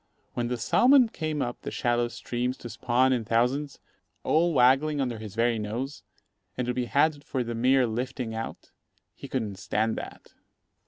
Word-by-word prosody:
When 120 -1 -1
the 125 0 -2
salmon 250 - +5
came 155 -6 -2
up 120 0 -5
the - - -5
shallow 120 0 0
streams 125 +1 -3
to 120 - -8
spawn 125 +4 +2
in 120 -3 0
thousands, 125 +6 0 0.5
all 170 +2 +3
waggling 145 +2 +4
under 125 -5 -2
his 105 -2 -8
very 115 0 +2
nose, 120 +7 -4 0.6
and 125 - -1
to 125 - -1
be 125 0 -1
had 145 +3 +2
for 130 -3 -2
the 120 0 -4
mere 130 +3 +3
lifting 120 +1 -3
out, 115 0 -6 0.4
he - - -10
couldn't 110 -7 -3
stand 110 +1 0
that. - - -9
125 Hz, 170 wpm, -27 LUFS, 115-135 Hz, 0.6 s, salmon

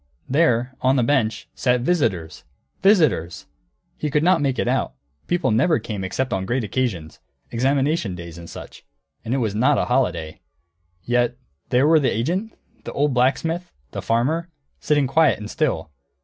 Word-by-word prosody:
There, 130 -4 +2
on 130 +1 +3
a 125 - +3
bench, 115 -4 0
sat 125 -1 +1
visitors. 115 - -1 0.4
Visitors! 125 - +2 0.5
He 150 - -1
could 150 +2 +1
not 180 -2 +4
make 135 -2 0
it - - -1
out; 125 - 0 0.3
people 175 -8 +1
never 135 +9 +3
came 105 -4 -5
except 125 +7 -2
on 95 0 -2
great 125 0 0
occasions, 100 -8 -3 0.3
examination 135 - 0
days 85 -1 -9
and 85 - -10
such. - - -10 0.4
And 115 - -5
it 135 - +2
was 110 -6 -1
not 125 +6 +3
a - - +1
holiday. 85 -12 -1 0.6
Yet 120 0 +1 0.3
there 125 +3 +3
were 160 +1 +5
the 140 - +2
agent, 180 - -2 0.3
the - - -7
old 145 0 +1
blacksmith, 160 +8 0 0.2
the - - -5
farmer, 150 +9 0 0.3
sitting 145 -2 +2
quiet 155 +4 +3
and 105 0 -8
still. 125 - -1
130 Hz, 165 wpm, -22 LUFS, 110-150 Hz, 0.6 s, were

